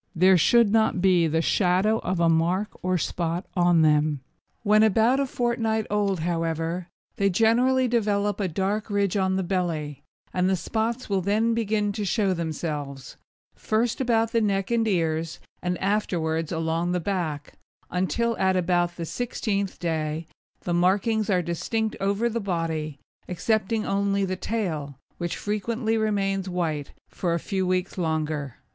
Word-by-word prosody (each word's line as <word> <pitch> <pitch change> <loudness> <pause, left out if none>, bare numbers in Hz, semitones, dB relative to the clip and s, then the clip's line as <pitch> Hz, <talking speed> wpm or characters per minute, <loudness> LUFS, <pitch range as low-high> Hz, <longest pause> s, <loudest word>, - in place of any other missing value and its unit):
There 185 +3 +6
should 205 +6 +4
not 220 -4 +2
be 180 -3 +4
the 160 +1 0
shadow 195 +5 +2
of 185 -1 -2
a 170 - +4
mark 170 +5 +2
or 185 0 +1
spot 170 +2 -2
on 175 -2 +4
them. 150 -2 +2 0.4
When 215 0 +5
about 220 +5 +4
a 275 - +1
fortnight 230 -3 0
old, 200 -4 +1
however, 165 +1 -2 0.3
they 200 0 +3
generally 245 +6 +3
develop 205 -3 0
a 200 - 0
dark 195 +6 -2
ridge 200 -2 0
on 190 -1 +1
the 190 - 0
belly, 165 -6 -2 0.3
and 180 0 +1
the 190 - +3
spots 225 +7 -2
will 195 -2 0
then 215 +5 +1
begin 215 -2 0
to 210 +1 -4
show 200 0 +1
themselves; 150 -5 -4 0.4
first 225 +3 -1
about 230 -3 +2
the 230 - +2
neck 195 -1 0
and 230 -1 +2
ears, 165 -4 -1 0.2
and 180 0 -1
afterwards 165 -6 -1
along 165 +1 -1
the 180 - +1
back, 165 -6 -3 0.4
until 225 +6 0
at 190 -1 +2
about 175 -1 +1
the 170 - -4
sixteenth 200 -2 -2
day 160 -1 -2 0.4
the 175 - -2
markings 200 +5 +2
are 180 -3 +2
distinct 220 +6 -2
over 200 +4 +1
the 235 0 -2
body, 165 -6 -2 0.3
excepting 215 +4 0
only 200 0 +1
the 185 0 -2
tail, 165 - -3 0.2
which 175 -1 -3
frequently 220 +2 -1
remains 195 -3 0
white 160 -5 -2 0.2
for 170 -2 -2
a - - -1
few 190 +1 -2
weeks 185 +1 -1
longer. 155 -5 -2
190 Hz, 155 wpm, -25 LUFS, 165-215 Hz, 0.4 s, There